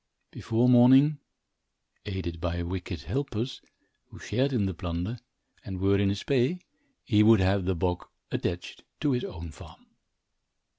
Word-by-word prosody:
Before 115 +2 0
morning, 130 +4 +6 0.9
aided 85 -4 -4
by 85 -1 -2
wicked 90 -3 -5
helpers, 130 -2 -3 0.5
who - - -14
shared 135 +2 -1
in 115 -6 +1
the 95 - -2
plunder, 90 +6 -4 0.4
and 95 -2 -6
were 100 +1 +3
in 100 -1 +2
his 100 0 -3
pay, 135 +5 +1 0.5
he 105 -4 +3
would 110 0 +6
have 95 0 +2
the 95 0 0
bog 90 0 -2 0.2
attached 90 0 -4 0.2
to 150 - +2
his 125 -1 0
own 85 -2 -7
farm. - - -15
100 Hz, 145 wpm, -28 LUFS, 90-125 Hz, 0.9 s, morning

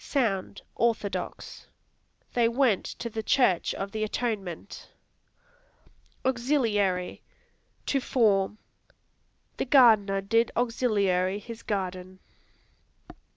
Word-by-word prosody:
Sound, 220 -9 -1
[orthodox]; 225 -4 -2 0.7
"They 235 -1 +3
went 235 -4 +2
to - - -6
the 225 -1 -4
church 220 -6 +2
of 195 0 -5
the 215 +1 -2
Atonement." 205 -6 -4 1.4
Auxiliary 230 -8 0 0.6
To 275 - +1
form; 210 -6 +1 1.0
"The - - -1
gardener 220 -8 +5
did 225 +4 +2
auxiliary 200 -6 +1
his 230 +2 -9
garden." 185 -3 -4
215 Hz, 85 wpm, -27 LUFS, 195-240 Hz, 1.4 s, gardener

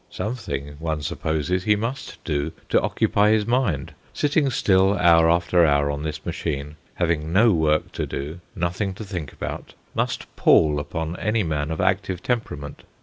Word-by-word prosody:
Something, 75 - -4
one 80 -2 -2
supposes, 80 +5 -1
he 105 -1 +4
must 120 +6 -4
do 75 0 -2 0.2
to - - +4
occupy 105 +1 +2
his 110 -1 +3
mind: 115 - 0 0.2
sitting 145 -1 +2
still 95 -4 +3
hour 85 -2 +5
after 85 +1 +3
hour 70 -2 +3
on 70 0 -4
this 75 0 -5
machine, 75 -3 -3 0.2
having 80 -2 0
no 110 +6 +5
work 75 -2 +1
to - - -3
do, 75 +5 -5 0.2
nothing 95 +2 -2
to 110 - -7
think 90 -8 -5
about, - - -6 0.2
must - - -3
pall 75 -2 +4
upon 80 +3 -4
any 110 0 0
man 75 -3 -2
of 80 - -3
active 95 -1 0
temperament. 75 - -3
85 Hz, 160 wpm, -23 LUFS, 75-100 Hz, 0.2 s, hour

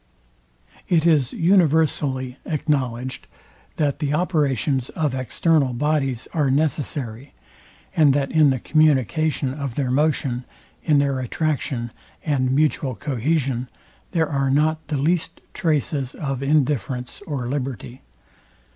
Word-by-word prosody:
It 165 -2 +3
is 150 -7 +3
universally 155 -7 +2
acknowledged, 130 -5 -2 0.5
that 145 -3 0
the 150 -1 0
operations 145 - 0
of 150 -4 -1
external 130 +1 +1
bodies 135 -2 0
are 150 -4 +1
necessary, 140 -3 -2 0.6
and 150 -3 +5
that 140 -1 0
in 155 -2 +5
the 130 - +1
communication 155 0 +2
of 140 -4 -5
their 135 -3 -1
motion, 135 -3 +1 0.4
in 150 -3 +3
their 140 -2 +1
attraction, 130 -3 -2 0.3
and 135 -4 +1
mutual 140 -2 +1
cohesion, 135 -2 -1 0.4
there 165 -3 +1
are 135 -2 0
nor 155 +3 +2
the 150 - -1
least 165 +5 0
traces 145 -4 -1
of 135 -3 -3
indifference 135 - 0
or 135 -6 -3
liberty. 130 -1 -4
140 Hz, 115 wpm, -22 LUFS, 130-155 Hz, 0.6 s, and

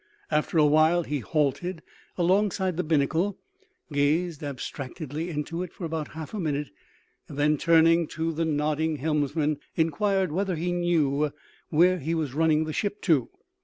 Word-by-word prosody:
After 150 +2 +1
a 155 - +6
while 155 +3 +4
he 150 -2 -2
halted 155 - -1 0.3
alongside 190 0 +1
the 180 - -1
binnacle, 165 +5 +1 0.6
gazed 155 +3 +1
abstractedly 145 +3 -5
into 165 +2 -3
it 180 -2 -5
for 180 - -6
about 160 -2 -3
half 160 +3 -7
a 215 - -3
minute, 150 - -2 0.6
and 140 - -9
then, 150 +1 +3
turning 165 +1 +4
to 165 +1 -2
the 165 +2 -1
nodding 155 +1 0
helmsman, 150 0 0 0.2
inquired 185 +3 +1
whether 190 +2 -1
he 175 +3 -2
knew 155 -5 +1 0.4
where 180 +3 +4
he 165 +3 -2
was 155 -5 -2
running 155 0 +3
the 155 0 -4
ship 205 +3 -2
to. 150 -9 +2
160 Hz, 155 wpm, -26 LUFS, 150-175 Hz, 0.6 s, a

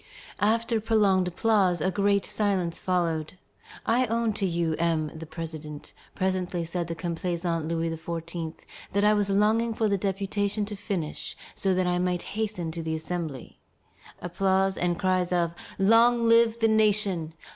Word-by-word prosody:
After 225 +2 +1
prolonged 205 -4 +3
applause 185 -1 +2
a 190 +5 0
great 200 +1 +2
silence 190 -5 0
followed. 170 -3 -1 0.5
"I 245 +2 +2
own 230 0 0
to 200 -1 -1
you, 170 -2 0
M. 160 -3 +1
the 160 0 -8
President," 155 -2 -7 0.2
presently 185 -2 -1
said 170 0 -3
the 165 - -4
complaisant 170 -1 -2
Louis 165 0 -1
XVI., 165 0 -5 0.4
"that 200 +1 +2
I 210 0 +5
was 205 -1 +1
longing 220 +3 +2
for 220 - +1
the 200 -1 +1
deputation 200 +2 -1
to 205 0 -6
finish, 190 -6 -4 0.2
so 190 -2 0
that 185 0 +1
I 180 0 +1
might 180 -1 0
hasten 205 -6 -2
to 165 +1 -5
the 160 0 -2
Assembly." 160 -4 -5 0.6
Applause 190 +2 +1
and 175 -1 0
cries 185 -2 +1
of 170 -2 +1 0.2
"Long 230 +4 +5
live 230 0 +5
the 225 - +5
nation! 205 -7 +2
185 Hz, 155 wpm, -27 LUFS, 170-210 Hz, 0.6 s, I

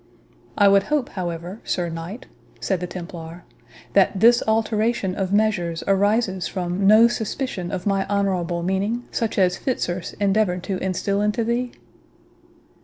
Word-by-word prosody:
"I 205 - +6
would 200 0 +6
hope, 295 -3 0
however, 175 +2 -5
Sir 175 -2 -1
Knight," 170 +8 -7 0.3
said 190 -3 -1
the 180 - -4
Templar, 170 -1 -8 0.5
"that 195 0 +3
this 235 +3 +6
alteration 220 -2 +1
of 190 0 -2
measures 200 -6 +1
arises 200 -1 +1
from 185 +1 -1
no 220 +3 +8
suspicion 220 -5 -3
of 185 -2 -4
my 195 -1 +1
honourable 185 -4 -1
meaning, 200 +6 -1
such 225 -1 -2
as 185 -1 +3
Fitzurse 180 -9 -2
endeavoured 195 -3 +1
to 185 -1 -3
instil 195 +2 -1
into 210 +3 0
thee?" 240 +2 -1
195 Hz, 140 wpm, -22 LUFS, 180-220 Hz, 0.5 s, no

